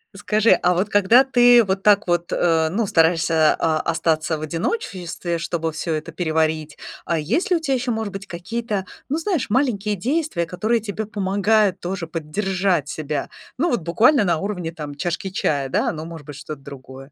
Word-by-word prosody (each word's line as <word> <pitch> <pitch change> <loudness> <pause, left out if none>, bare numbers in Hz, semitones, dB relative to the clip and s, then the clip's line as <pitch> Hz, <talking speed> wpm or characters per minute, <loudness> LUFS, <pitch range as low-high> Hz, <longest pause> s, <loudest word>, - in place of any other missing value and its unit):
Скажи, 215 +2 +2
а 180 - +4
вот 190 +4 0
когда 205 +6 +5
ты 245 -2 +6
вот 195 0 -2
так 205 -1 +4
вот, 175 0 0
э, 160 -2 +2
ну, 210 +4 -1
стараешься, 165 -2 +3
а, 160 -1 +1
остаться 160 -1 0
в - - -9
одиночестве, 170 - -3
чтобы 165 -1 -2
всё 160 +1 -3
это 155 +2 -4
переварить. 160 -2 -1 0.3
А 165 -1 0
есть 265 - -1
ли 355 - +5
у - - -3
тебя 275 -4 0
еще, 250 0 -1
может 220 -3 -3
быть, 195 0 -6
какие-то, 205 +3 -4 0.2
ну, 295 - 0
знаешь, 330 - -1
маленькие 210 -5 +1
действия, 250 - -1
которые 215 +7 0
тебе 215 0 -5
помогают 200 -1 +1
тоже 175 -2 -4
поддержать 180 0 -1
себя? 155 -2 -4 0.3
Ну, 335 +6 +1
вот 235 - 0
буквально 215 - +4
на 170 -4 +1
уровне 180 -3 -3
там 150 -3 -7
чашки 175 +4 -3
чая, 145 -7 -1
да? - - +1
Ну, 155 0 -6
может 165 -3 -9
быть, 145 -2 -9
что-то 150 -1 -8
другое. 135 0 -11
180 Hz, 180 wpm, -21 LUFS, 160-215 Hz, 0.3 s, ты